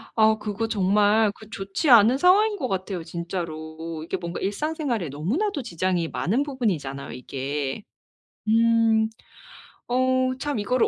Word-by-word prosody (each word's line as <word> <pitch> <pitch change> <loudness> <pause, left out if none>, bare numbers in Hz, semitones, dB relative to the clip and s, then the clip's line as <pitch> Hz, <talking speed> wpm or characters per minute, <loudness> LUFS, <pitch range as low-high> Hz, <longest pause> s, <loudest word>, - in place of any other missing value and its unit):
아 220 -1 +4
그거 210 +1 -3
정말 210 +1 +3
그 220 -1 -14
좋지 200 +9 -2
않은 235 +1 +7
상황인 405 +6 +4
것 275 -8 -2
같아요 190 -4 -3
진짜로. 165 -2 -5
이게 - - -3
뭔가 170 0 -5
일상생활에 240 - -2
너무나도 280 - -1
지장이 180 -5 -1
많은 230 - 0
부분이잖아요 180 - -3
이게. 135 +5 -4 0.6
음. 225 0 +3 0.8
어. 255 +1 +2
참 290 -2 -2
이거를 245 +4 +2
210 Hz, 285 characters per minute, -24 LUFS, 170-255 Hz, 0.8 s, 않은